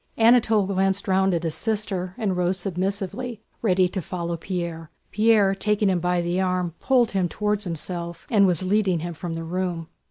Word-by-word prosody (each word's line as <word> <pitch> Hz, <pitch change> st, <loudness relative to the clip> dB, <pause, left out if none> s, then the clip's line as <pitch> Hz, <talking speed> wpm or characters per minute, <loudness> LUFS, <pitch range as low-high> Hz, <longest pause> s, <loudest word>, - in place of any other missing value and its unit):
Anatole 225 Hz, -3 st, +4 dB
glanced 195 Hz, 0 st, 0 dB
round 190 Hz, 0 st, +3 dB
at 170 Hz, -, -2 dB
his 165 Hz, -2 st, -1 dB
sister 190 Hz, -4 st, -2 dB
and 205 Hz, -6 st, -1 dB
rose 180 Hz, +1 st, 0 dB
submissively, 200 Hz, +5 st, -3 dB, 0.2 s
ready 185 Hz, -4 st, +3 dB
to 190 Hz, -, -3 dB
follow 170 Hz, 0 st, -4 dB
Pierre. 170 Hz, -2 st, -5 dB, 0.2 s
Pierre, 215 Hz, -2 st, +4 dB
taking 210 Hz, +1 st, +1 dB
him 180 Hz, -, +1 dB
by 180 Hz, 0 st, +1 dB
the 175 Hz, +2 st, 0 dB
arm, 180 Hz, -2 st, -1 dB
pulled 250 Hz, -4 st, +3 dB
him 185 Hz, -3 st, 0 dB
toward 210 Hz, +1 st, -1 dB
himself 170 Hz, -1 st, -5 dB
and 200 Hz, -4 st, +5 dB
was 180 Hz, -1 st, +2 dB
leading 190 Hz, -3 st, +1 dB
him 175 Hz, +1 st, -4 dB
from 165 Hz, +1 st, -5 dB
the 165 Hz, -, -4 dB
room. 170 Hz, -1 st, -3 dB
185 Hz, 180 wpm, -24 LUFS, 175-205 Hz, 0.2 s, and